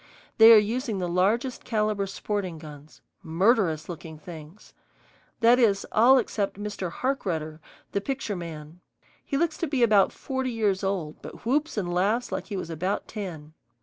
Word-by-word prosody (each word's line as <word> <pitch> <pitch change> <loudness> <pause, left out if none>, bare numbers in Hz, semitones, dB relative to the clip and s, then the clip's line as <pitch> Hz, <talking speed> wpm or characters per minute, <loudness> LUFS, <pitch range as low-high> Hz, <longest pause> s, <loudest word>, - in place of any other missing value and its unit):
They 225 +1 +10
are 225 - +10
using 225 +1 0
the 180 -2 -2
largest 210 +9 0
caliber 210 -3 0
sporting 195 -3 -3
guns, 150 -1 -13 0.2
murderous 170 -1 +1
looking 165 -2 -8
things. 160 +3 -12 0.7
That 235 +2 +6
is, 205 -5 +3
all 245 +5 +6
except 210 -5 -1
Mr. 205 -3 -4
Harkrudder, 170 - -2 0.3
the 200 - -1
picture 265 -3 -3
man. 165 -1 -8 0.4
He 275 - -2
looks 335 +1 0
to 335 - -1
be 270 -4 +1
about 210 -4 +5
forty 265 -1 -3
years 210 -5 0
old, 185 -6 -3
but - - -11
whoops 290 +3 0
and 175 -4 -2
laughs 210 +7 +1
like - - -4
he 205 - -4
was 170 -2 -5
about 180 +5 -2
ten. 165 -8 -7
200 Hz, 160 wpm, -26 LUFS, 170-230 Hz, 0.7 s, They